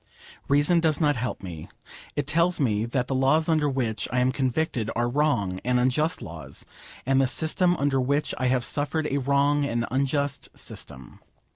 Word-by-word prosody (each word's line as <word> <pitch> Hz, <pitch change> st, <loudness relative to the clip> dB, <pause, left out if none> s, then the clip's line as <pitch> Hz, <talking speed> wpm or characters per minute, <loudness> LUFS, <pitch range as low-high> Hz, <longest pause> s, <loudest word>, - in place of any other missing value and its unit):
Reason 145 Hz, +5 st, +3 dB
does 160 Hz, -3 st, +1 dB
not 150 Hz, -3 st, +3 dB
help 125 Hz, -3 st, -4 dB
me. 85 Hz, -4 st, -8 dB, 0.5 s
It 145 Hz, -, -1 dB
tells 170 Hz, +4 st, +2 dB
me 110 Hz, -6 st, +1 dB
that 125 Hz, +1 st, -1 dB
the -, -, -2 dB
laws 135 Hz, +5 st, +2 dB
under 155 Hz, -3 st, +2 dB
which 120 Hz, -5 st, -2 dB
I 125 Hz, -, +1 dB
am 125 Hz, +1 st, +3 dB
convicted 130 Hz, -3 st, -1 dB
are 120 Hz, 0 st, +1 dB
wrong 120 Hz, -9 st, 0 dB
and 125 Hz, 0 st, +2 dB
unjust 150 Hz, +7 st, 0 dB
laws, 85 Hz, -2 st, -9 dB, 0.4 s
and 135 Hz, +1 st, +3 dB
the 135 Hz, -, +3 dB
system 170 Hz, +6 st, +1 dB
under 140 Hz, -2 st, +1 dB
which 140 Hz, +4 st, 0 dB
I 130 Hz, -, +1 dB
have 125 Hz, -1 st, +1 dB
suffered 145 Hz, +5 st, -2 dB
a 140 Hz, -, +1 dB
wrong 140 Hz, +2 st, +2 dB
and 120 Hz, -4 st, -1 dB
unjust 140 Hz, +1 st, -1 dB
system. 65 Hz, -2 st, -10 dB
135 Hz, 175 wpm, -26 LUFS, 125-150 Hz, 0.5 s, Reason